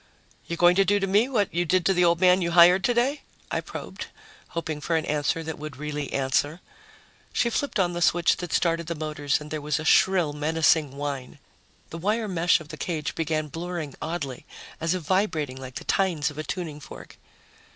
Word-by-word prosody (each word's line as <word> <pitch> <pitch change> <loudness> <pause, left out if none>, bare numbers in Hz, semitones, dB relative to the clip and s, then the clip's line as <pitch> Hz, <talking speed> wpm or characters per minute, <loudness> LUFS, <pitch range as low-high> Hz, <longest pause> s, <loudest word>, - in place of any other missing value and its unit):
"You're 170 - -4
going 175 +1 +5
to 195 - +6
do 205 +2 +2
to 195 - 0
me 205 +6 +3
what 210 -7 0
you 175 +1 +1
did 180 +1 +1
to 195 - +4
the 180 -1 +3
old 170 -1 +3
man 185 0 +5
you 170 - 0
hired 180 +2 +7
today?" 245 +6 +1 0.3
I - - 0
probed, - - -8 0.4
hoping 160 -3 -4
for 165 - -1
an 160 - 0
answer 150 +2 0
that 160 -2 -6
would 150 -3 -7
really 150 -1 -4
answer. 140 +4 0 0.7
She 235 -1 +1
flipped 285 +1 -1
on 175 -2 +2
the 175 - -4
switch 175 0 +3
that 175 -2 -6
started 165 -1 +1
the 170 - -3
motors 150 -2 -1
and 150 0 -10
there 155 -1 -3
was 150 +1 -1
a 155 - -5
shrill, 175 -4 +4
menacing 150 -1 +2
whine. 140 -3 -5 0.5
The 165 - -6
wire 215 +5 0
mesh 175 -2 +2
of 155 -2 -12
the - - -8
cage 155 -3 -3
began 155 -1 -1
blurring 165 -2 -5
oddly, 150 -6 -5 0.3
as 165 +2 0
if 180 - -4
vibrating 155 -7 0
like 130 -1 -9
the - - -6
tines 165 -7 +1
of 145 - -10
a - - -2
tuning 155 -1 -5
fork. 145 - -12
165 Hz, 205 wpm, -25 LUFS, 150-180 Hz, 0.7 s, hired